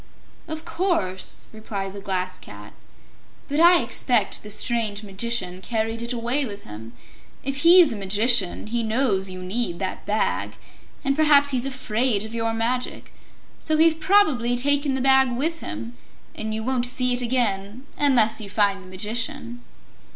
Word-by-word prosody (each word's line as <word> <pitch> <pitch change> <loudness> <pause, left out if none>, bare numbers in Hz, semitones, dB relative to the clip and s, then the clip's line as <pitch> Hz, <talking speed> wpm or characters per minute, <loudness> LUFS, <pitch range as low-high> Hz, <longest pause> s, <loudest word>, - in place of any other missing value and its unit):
"Of 315 +1 -6
course," 330 - -2
replied 200 -3 -6
the 200 - -8
Glass 185 -2 -3
Cat. - - -12 0.7
"But 290 +1 -2
I 345 +1 +6
expect - - 0
the 210 - -10
strange 215 -1 -1
Magician 195 -2 -2
carried 225 +2 -2
it 235 +1 -4
away 245 +4 0
with 205 -5 -7
him. 110 +2 -10 0.5
If 275 0 -3
he's 335 -1 +6
a - - -6
magician, 205 0 +1
he 230 +2 -2
knows 220 -4 0
you 185 0 -8
need 185 -1 -2
that 190 0 -5
Bag, 215 +1 -1 0.5
and 275 0 +1
perhaps 290 -2 +4
he's 260 0 0
afraid 240 -4 0
of 220 - -9
your 225 -1 -1
magic. 235 +3 -3 0.5
So 310 -1 -1
he's 325 +1 +5
probably 310 -9 +2
taken 285 +1 +3
the 265 - -2
Bag 265 -1 +4
with 320 +7 -2
him, 115 +3 -7 0.4
and 220 0 -5
you 220 0 -3
won't 250 0 +1
see 250 0 +2
it 245 - +2
again 230 -1 -1
unless 240 -7 +3
you 205 - -8
find 200 -1 +1
the 185 - -14
Magician." 230 +4 -4
235 Hz, 160 wpm, -23 LUFS, 205-265 Hz, 0.7 s, I